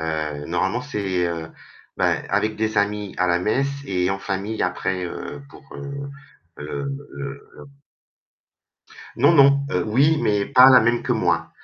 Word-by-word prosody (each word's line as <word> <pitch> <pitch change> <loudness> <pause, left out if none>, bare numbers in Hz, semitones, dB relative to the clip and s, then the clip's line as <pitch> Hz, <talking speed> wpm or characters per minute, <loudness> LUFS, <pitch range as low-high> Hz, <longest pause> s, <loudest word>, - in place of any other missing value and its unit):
Heu, 75 -2 -3
normalement, 95 +7 -1
c'est, 95 -9 -2
heu, 85 -2 -4 0.5
ben, - - +1
avec 110 0 0
des 110 -1 0
amis 105 -1 -1
à 90 - +2
la 85 0 +2
messe 135 +9 0
et 90 -5 -1
en 95 - -2
famille 100 +3 -3
après, 90 0 -2
heu, 85 +10 -7
pour, - - -15
heu 140 0 -7 0.5
heu 140 - -5 0.6
heu - - -12 1.5
Non, 140 +7 +5
non. 140 -2 +5
Heu, 90 - 0
oui, 140 +8 +3
mais 105 -1 +1
pas 130 -1 +7
la 130 - +8
même 115 +1 +1
que - - 0
moi. - - 0
105 Hz, 155 wpm, -22 LUFS, 90-135 Hz, 1.5 s, la